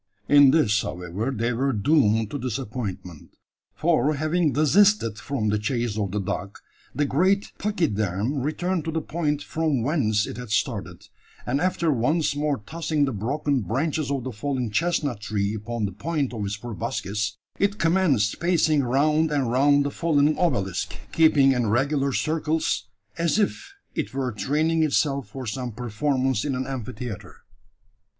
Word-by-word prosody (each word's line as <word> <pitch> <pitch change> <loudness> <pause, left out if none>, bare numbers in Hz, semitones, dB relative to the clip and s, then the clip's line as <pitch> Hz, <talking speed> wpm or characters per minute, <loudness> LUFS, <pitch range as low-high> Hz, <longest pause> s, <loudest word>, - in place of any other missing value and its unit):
In 145 -1 +7
this, 110 -9 +3
however, 90 +7 -4
they 120 -1 -1
were 135 +4 0
doomed 110 -3 +2
to 145 - -3
disappointment; 110 - -5 0.4
for 155 -3 +2
having 155 +2 +1
desisted 155 - +3
from 130 -7 -2
the 105 0 +1
chase 115 0 -1
of 105 -3 -1
the 105 +3 -2
dog, 100 +1 -4 0.4
the 145 - +1
great 185 +9 +1
pachyderm 130 - -1
returned 175 +5 -1
to 160 - -2
the 160 - -1
point 150 -2 -2
from 155 -7 -1
whence 115 -7 +1
it - - -7
had 125 -2 -7
started; 105 - -2 0.4
and, 135 +4 0
after 175 -3 +1
once 150 +5 +1
more 145 -1 0
tossing 160 -2 0
the 135 - -2
broken 140 +6 -1
branches 140 +7 -1
of 140 -3 -1
the 130 - -4
fallen 125 +1 -3
chestnut 145 -4 0
tree 105 -1 -1
upon 110 +1 -3
the 100 - -3
point 140 - -2
of 110 -3 -4
its 100 +1 -3
proboscis, 105 -1 -3 0.2
it 200 +1 +1
commenced 165 - +2
pacing 165 -4 +2
round 150 +5 +2
and 135 -5 0
round 140 +3 +4
the 145 - -1
fallen 155 -2 +2
obelisk, 110 - -1 0.2
keeping 150 -4 +5
in 125 -3 +1
regular 135 +5 +1
circles, 155 +1 -1 0.3
as 170 +3 +2
if 395 - -1 0.2
it 155 -5 -4
were 130 -2 -1
training 155 +9 0
itself 140 -4 +1
for 130 +5 -7
some 125 +2 -4
performance 130 +2 -1
in 140 -3 -1
an 130 +1 -2
amphitheatre. 125 -5 -7
135 Hz, 155 wpm, -24 LUFS, 110-155 Hz, 0.4 s, In